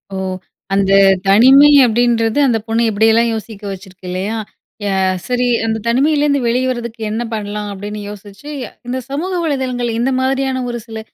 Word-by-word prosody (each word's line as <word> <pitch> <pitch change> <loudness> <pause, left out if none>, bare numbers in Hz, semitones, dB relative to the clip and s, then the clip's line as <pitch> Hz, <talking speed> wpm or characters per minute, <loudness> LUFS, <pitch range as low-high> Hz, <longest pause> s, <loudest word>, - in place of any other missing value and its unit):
ஓ! - - -3 0.6
அந்த 195 0 +2 0.4
தனிமை 260 +9 +7 0.2
அப்படின்றது, 235 +1 +1
அந்த 235 -3 +2
பொண்ணு 225 +1 0
எப்படியெல்லாம் 225 +2 +3
யோசிக்க 220 -1 -7
வச்சிருக்கு 190 -1 -11
இல்லையா? 190 +5 -3 0.5
ய 205 - -1 0.4
சரி, 250 0 0 0.2
அந்த 220 0 -1
தனிமையிலேருந்து 285 +3 +2
வெளிய 250 +2 +1
வர்றதுக்கு 235 -2 -5
என்ன 220 +2 -2
பண்ணலாம்? 210 -1 -4
அப்படின்னு 205 +2 -6
யோசிச்சு 205 +6 -11 0.4
இந்த 255 +1 -2
சமூக 310 +7 -3
வலைதளங்கள், 260 -5 -2
இந்த 255 +3 +1
மாதிரியான 265 0 0
ஒரு 240 - -3
சில 225 -1 -7
230 Hz, 145 wpm, -16 LUFS, 210-260 Hz, 0.6 s, தனிமை